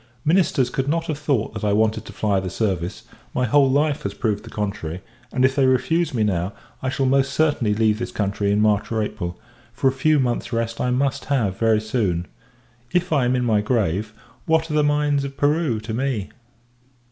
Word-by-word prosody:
Ministers 150 -7 +2
could 135 +1 -2
not 165 +2 0
have 155 -4 -3
thought 140 -9 0
that 105 - -6
I 105 -1 +2
wanted 110 +1 +1
to - - -9
fly 100 -3 0
the 95 -1 -4
service, 95 +1 -2 0.3
my 125 - +2
whole 135 +3 +4
life 145 +2 +1
has - - -4
proved 105 -4 -1
the - - -10
contrary; 100 -5 -4 0.3
and, 130 0 +2
if 135 0 +2
they 135 -2 +3
refuse 160 +7 +2
me 115 -5 0
now: 95 -1 0 0.3
I 130 - -1
shall 135 +1 0
most 135 +1 +2
certainly 145 -9 +2
leave 110 -1 +2
this 120 - -4
country 100 0 -1
in 105 +1 +2
March 105 0 +2
or 110 -1 +1
April; 90 -4 -5 0.3
for - - 0
a - - +4
few 145 +3 +2
months 125 -1 -1
rest 115 -1 -2
I 125 - +1
must 130 +2 0
have, 110 -10 0
very 110 -2 +3
soon. 105 -6 -1 0.7
If 180 -1 +1
I 140 -4 +3
am 125 +1 +2
in 125 -1 0
my 110 -3 +3
grave, 105 -2 0 0.4
what 160 0 +2
are - - -2
the 150 0 +3
mines 145 -1 +2
of 140 0 -6
Peru 145 -5 +1
to 110 +1 -5
me! 120 -4 -2
120 Hz, 210 wpm, -22 LUFS, 105-140 Hz, 0.7 s, whole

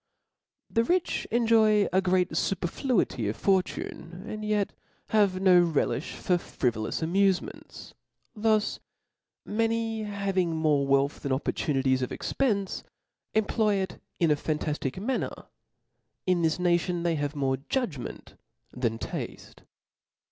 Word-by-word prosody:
The 230 - +1
rich 355 +7 0
enjoy 220 -3 +4
a 190 - +4
great 185 -1 +2
faperfl«ity 185 - 0
of 105 - -2
fortune, 185 -2 -1
and 215 0 -5
yet 210 -1 0 0.4
have 200 -4 +3
no 185 -2 +6
relifli 160 -5 +1 0.2
for 180 -1 +1
frivolous 115 -7 -2
amufements: 190 +2 -1 0.4
thus 215 -1 +1 0.7
many 225 +1 0
having 195 -5 -1
more 150 -3 +2
wealth 140 +1 +2
than 140 - -3
opportunities 130 -1 +1
of 125 - -2
expence, 205 -8 -1 0.5
employ 215 0 +2
it 190 -2 -3 0.2
in 165 -3 +3
a - - +5
fantaftical 150 +2 -2
manner: 255 +2 -2 0.8
in 180 -2 +2
this 160 -1 +2
nation 175 -1 +1
they 170 -1 +2
have 145 -1 -2
more 135 -2 0
judgment 190 - -3 0.4
than 115 -3 -1
tafte. - - -6
185 Hz, 120 wpm, -28 LUFS, 150-210 Hz, 0.8 s, no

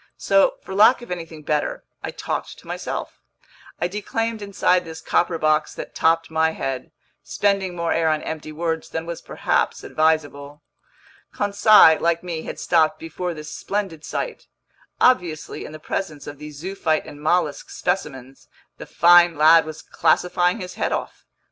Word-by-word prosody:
So, 195 0 +3
for 190 - -8
lack 220 +5 +5
of 240 - -11
anything 165 -3 -6
better, 150 0 -1 0.2
I - - -4
talked - - -5
to - - -17
myself: - - -5 0.6
I 175 - 0
declaimed 220 +3 -3
inside 190 -2 +1
this 160 -1 -9
copper 175 -1 0
box 155 -1 +1
that - - -8
topped 165 0 +1
my 160 0 +2
head, 135 -4 -4 0.3
spending 195 -3 0
more 170 -1 -1
air 165 -1 +2
on 155 -1 0
empty 155 -1 -6
words 160 +1 -3
than 160 0 -4
was 170 0 -6
perhaps - - -1
advisable. 150 -2 -1 0.7
Conseil, 205 -5 +5
like 170 0 +1
me, 170 -3 -4
had - - -7
stopped 160 -2 +2
before 165 +2 -5
this 155 0 -8
splendid 195 -6 -4
sight. - - -5 0.5
Obviously, 175 -11 +1
in - - -9
the 155 - -8
presence 155 -2 -5
of 145 -1 -9
these 150 -1 -9
zoophyte 165 -2 -1
and 145 - -11
mollusk 160 -1 0
specimens, 135 -8 -4 0.3
the - - -9
fine 175 -1 +5
lad 160 +2 +6
was 155 -1 -8
classifying 180 +3 +1
his 180 0 -7
head - - -2
off. - - -5
165 Hz, 160 wpm, -22 LUFS, 155-180 Hz, 0.7 s, lad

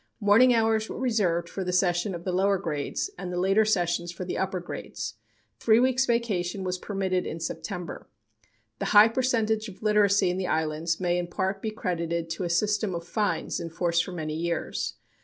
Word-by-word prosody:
Morning 220 +4 +6
hours 225 -2 +2
were - - -5
reserved 200 -9 +1
for 190 - -4
the 180 - -2
session 180 +1 +1
of 170 - -7
the 185 - -2
lower 195 +2 +2
grades 165 - -3
and 180 - -5
the 180 - -3
later 195 +4 +4
sessions 175 -4 0
for 185 +1 -6
the 180 - -3
upper 190 -1 -1
grades. 175 - -6 0.5
Three 220 0 +4
weeks' 260 +1 +2
vacation 200 -6 0
was 185 0 -2
permitted 190 -2 -1
in 160 - -5
September. 175 +2 -5 0.7
The - - -2
high 215 +2 +9
percentage 225 -3 0
of 195 +2 -13
literacy 205 -3 +4
in 180 - -3
the 185 -1 -2
islands 160 +1 -1
may 175 -1 +1
in 175 - -3
part 190 +2 -2
be 220 - -2
credited 170 -5 -2
to 165 +3 -3
a 175 - -2
system 205 +2 +1
of 170 0 -6
fines 170 -3 -1
in 170 -1 -5
force 170 +1 +1
for 185 - -6
many 155 -3 -4
years. 170 +2 -2
185 Hz, 195 wpm, -27 LUFS, 170-215 Hz, 0.7 s, high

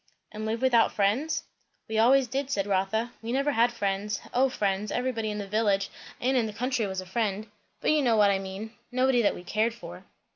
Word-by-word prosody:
"And 215 0 -5
live 230 +3 -2
without 240 -3 +4
friends?" 220 +10 0 0.4
"We 220 0 -1
always 260 +3 +5
did," 270 +3 -2
said 200 -9 0
Rotha. 205 +4 0
"We 225 +1 -4
never 275 +3 +1
had 240 -2 +3
friends. 205 -2 -2
O 265 +2 +3
friends! 200 -3 -1
everybody 245 -4 -1
in 210 - -3
the 205 - -4
village 200 -1 +1 0.3
and 260 +2 +1
in 235 -3 +2
the 215 - -6
country 245 -2 -1
was 190 -1 -3
a - - -10
friend; 210 +1 -1 0.4
but - - +2
you 305 -1 +3
know 240 -4 +3
what 205 -2 +5
I 195 - +1
mean; 195 +4 -7 0.2
nobody 255 0 +3
that 205 - +2
we 175 - -9
cared 220 +5 0
for." - - -10
220 Hz, 215 wpm, -27 LUFS, 200-250 Hz, 0.4 s, always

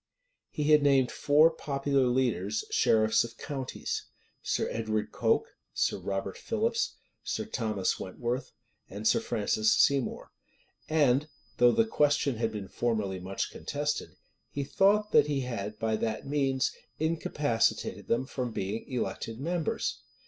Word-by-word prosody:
He 150 -1 0
had 150 -1 +7
named 135 -3 +4
four 150 +3 +5
popular 140 -3 0
leaders, 115 -5 0
sheriffs 110 0 +4
of 115 0 -9
counties; 135 -3 -4 0.4
Sir - - 0
Edward 110 -1 -2
Coke, - - +1 0.3
Sir - - +1
Robert 95 -1 -4
Philips, 230 +1 -1 0.3
Sir - - -2
Thomas 110 - -1
Wentworth, 120 +7 -3 0.4
and 105 +3 -3
Sir - - +4
Francis 110 0 +1
Seymour; 135 +2 +1 0.6
and, 145 -2 +3 0.3
though 120 0 +6
the 225 - +3
question 145 - +2
had 115 0 0
been 105 -3 -6
formerly 100 -2 -1
much 95 +2 -3
contested,[] 145 +1 -3 0.3
he 140 - -3
thought 205 +8 +3
that 145 - +5
he 145 -2 0
had 110 -4 -4
by 110 -1 0
that 110 0 -2
means 135 -2 +1 0.3
incapacitated 150 -6 0
them 120 +3 +1
from 125 -2 -4
being 110 +5 -4
elected 115 -2 -3
members. 165 +3 -2
125 Hz, 135 wpm, -29 LUFS, 110-145 Hz, 0.6 s, had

